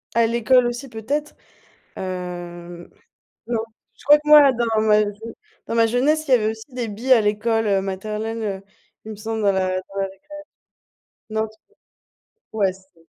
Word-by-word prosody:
À 230 0 +4
l'école 235 +2 +3
aussi 240 +3 -4
peut-être. 275 +6 -3 0.6
Hem. 175 -2 -7 0.6
Non. 235 -1 -1 0.4
Je - - -19
crois 295 +2 +8
que 300 0 -9
moi 295 -2 +8
dans 230 -3 0
ma 215 -1 +4
jeu 210 +2 -6 0.3
dans - - -3
ma 230 -1 +4
jeunesse, 290 +7 +1
il - - -3
y - - +9
avait 215 -3 +2
aussi 220 +4 -10
des 245 -2 -2
billes 235 +6 0
à 235 - +7
l'école, 220 +2 0
heu, 195 -2 +2
maternelle, 215 +4 -4
heu, 195 -3 -3 0.4
il 220 - -8
me - - -9
semble 220 +1 -4
dans 200 - +4
la 190 -1 0
dans 190 +1 -18
la 195 - 0
récréa 195 0 -9 1.1
non 220 0 -1 0.9
dis-moi. 220 - -3
Ouais - - 0
c'est 190 -3 -22
220 Hz, 180 wpm, -22 LUFS, 195-240 Hz, 1.1 s, y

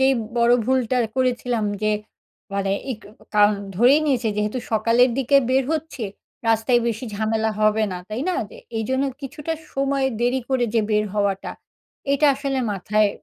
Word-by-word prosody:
যেই 265 0 +5 0.2
বড়ো 235 +1 +5
ভুলটা 255 -1 +1 0.2
করেছিলাম 245 -3 0 0.2
যে, 215 - +2 0.6
মানে 195 -1 0 0.2
ইক 220 - -9 0.2
ও - - -18
কারণ 210 0 +5 0.2
ধরেই 250 +8 +5
নিয়েছে 250 -5 +1
যেহেতু 210 +4 -1
সকালের 230 +3 +4
দিকে 270 +2 +3
বের 265 +1 +3
হচ্ছি, 310 -4 -4 0.5
রাস্তায় 225 +2 +3
বেশি 230 +2 -2
ঝামেলা 220 +1 0
হবে 215 +1 +3
না, - - -3
তাই 215 +3 -4
না? 365 - +1 0.2
যে 485 - -12 0.2
এইজন্য 260 +5 0 0.2
কিছুটা 295 +3 -5 0.2
সময় 275 0 +1
দেরি 245 +2 +2
করে 260 -2 +2
যে 225 - +4
বের 210 0 +2
হওয়াটা, 200 -2 0 0.6
এটা 290 +2 +3
আসলে 275 -1 -2
মাথায় 210 +2 +2
240 Hz, 160 wpm, -22 LUFS, 215-265 Hz, 0.6 s, যেই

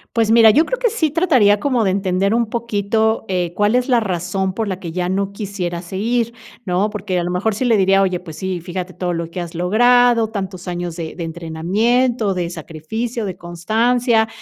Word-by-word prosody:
Pues 225 -2 +2
mira, 225 -1 +7
yo 305 +9 +4
creo - - -3
que - - +2
sí 320 -10 0
trataría 255 - +3
como 250 -4 +1
de 190 - +2
entender 195 +1 0
un 235 -1 +1
poquito, 220 -1 0
eh, 180 -2 -1
cuál 210 +5 +2
es 250 +2 +1
la 245 -2 +4
razón 190 -1 -2
por 225 0 -2
la 190 -2 -3
que 170 -3 -6
ya 180 +1 -2
no 195 +1 -1
quisiera 190 -4 -4
seguir, 230 +6 -1 0.3
¿no? 185 +3 +1
Porque 200 -3 -3
a 175 - -1
lo 175 - -3
mejor 185 +5 0
sí 215 - -3
le 235 -3 +3
diría: 195 0 +4
"Oye, 185 -2 0
pues 160 -2 -10
sí, 190 -1 -3
fíjate 180 +2 -6
todo 180 0 -2
lo 165 -1 -4
que 175 - -6
has 170 -1 -6
logrado, 230 +6 +4
tantos 190 -3 -6
años 175 -1 -4
de 165 -2 -6
de 175 - -5
entrenamiento, 195 +8 0
de 175 -2 -2
sacrificio, 195 +9 -5
de 185 -3 -5
constancia". 220 +7 +1
200 Hz, 210 wpm, -19 LUFS, 180-230 Hz, 0.3 s, mira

